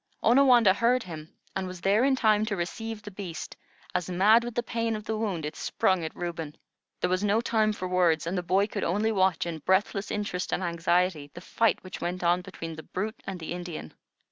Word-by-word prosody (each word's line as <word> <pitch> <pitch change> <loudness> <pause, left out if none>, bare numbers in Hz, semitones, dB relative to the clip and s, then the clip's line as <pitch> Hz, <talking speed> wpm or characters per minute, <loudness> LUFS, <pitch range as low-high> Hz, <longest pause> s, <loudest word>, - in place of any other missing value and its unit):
Onawandah 240 -4 +6
heard 235 +4 +2
him, 160 -3 -9 0.2
and 190 -1 -2
was 185 -1 -7
there 200 +5 +3
in 270 0 +4
time 215 -4 +3
to 205 - -1
receive 220 +4 -4
the 210 - -8
beast, 185 -5 -7 0.4
as, 180 -1 -1
mad 210 +6 +5
with 240 -1 -6
the 240 - 0
pain 230 -1 -1
of 215 - -6
the 220 +1 -2
wound, 200 -8 -2
it 150 - -5
sprung 185 -3 +1
at 160 - -5
Reuben. 165 -3 -5 0.4
There 180 - +1
was 185 +2 +1
no 205 +2 +3
time 220 -2 +2
for 185 -3 -4
words, 175 -3 +2
and 170 +3 -2
the 180 - 0
boy 185 +3 +2
could 210 - -4
only 210 +5 +1
watch 190 -4 +2
in 165 -2 -4
breathless 195 +4 +1
interest 205 -3 -3
and - - -1
anxiety 170 -2 +1
the - - -6
fight 230 +4 +1
which 185 - -8
went 180 +1 -3
on 175 +1 +3
between 165 -2 -7
the - - -6
brute 215 +7 -5
and 190 -2 -4
the 160 +1 -5
Indian. 175 - -6
185 Hz, 220 wpm, -28 LUFS, 175-215 Hz, 0.4 s, Onawandah